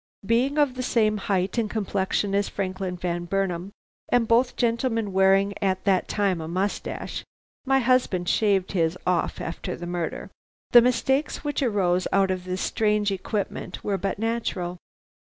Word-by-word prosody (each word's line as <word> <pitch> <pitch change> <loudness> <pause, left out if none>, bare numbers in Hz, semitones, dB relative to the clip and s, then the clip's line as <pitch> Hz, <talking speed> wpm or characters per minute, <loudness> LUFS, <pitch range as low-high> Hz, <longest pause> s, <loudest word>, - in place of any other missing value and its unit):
"Being 250 +7 +2
of 290 -4 +3
the 255 - -4
same 215 -4 +2
height 195 +2 0
and 220 -2 0
complexion 200 -1 -1
as 200 0 +1
Franklin 185 -1 -3
Van 175 0 -3
Burnam, 190 0 -2 0.4
and 240 -2 +3
both 240 +3 +3
gentlemen 230 -3 0
wearing 195 +1 +4
at 190 -2 0
that 190 -3 +2
time 195 -5 0
a 160 - -5
moustache 190 +4 -3 0.4
(my 270 0 +4
husband 250 -8 +2
shaved 200 -3 +2
his 170 -2 +1
off 180 -2 0
after 165 - -4
the 175 - -7
murder), 175 -2 -4 0.4
the 240 - +9
mistakes 265 +4 +1
which 290 0 -2
arose 190 -7 +1
out 195 -1 +3
of 185 -1 -3
this 185 +1 -3
strange 210 -1 +1
equipment 195 -1 -4
were 200 -2 -1
but 195 -1 -2
natural. 200 -5 -2
200 Hz, 155 wpm, -25 LUFS, 185-230 Hz, 0.4 s, the